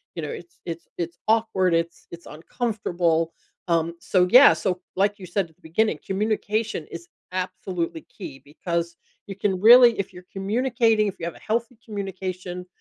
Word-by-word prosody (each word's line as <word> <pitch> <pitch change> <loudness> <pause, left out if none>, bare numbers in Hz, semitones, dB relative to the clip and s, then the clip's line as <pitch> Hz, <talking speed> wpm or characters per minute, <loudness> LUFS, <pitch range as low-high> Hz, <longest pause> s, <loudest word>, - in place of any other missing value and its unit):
you - - -4
know, - - -4
it's 430 -6 -9
it's 170 0 -6
it's 170 0 -4
awkward, 220 -5 +2
it's 165 0 -1
it's 170 0 -10
uncomfortable. 170 -3 -1 0.3
Um, 170 0 +1
so, 180 0 +2
yeah, 255 +4 +9
so, 185 -3 -2 0.2
like 200 +2 +1
you 190 - -9
said 180 -1 -1
at 160 - -26
the - - -37
beginning, 170 +3 +1
communication 210 -2 -1
is 170 0 -8 0.2
absolutely 180 -2 -3
key 135 - -8
because 170 +3 -3 0.3
you 195 - -7
can 195 -2 0
really 235 +2 +8
if 195 0 -3
you're 180 0 -12
communicating, 225 +1 +1
if 195 - -3
you 165 - -4
have 170 - -4
a - - -14
healthy 235 +3 -2
communication, 185 -4 -5
185 Hz, 170 wpm, -24 LUFS, 170-215 Hz, 0.3 s, yeah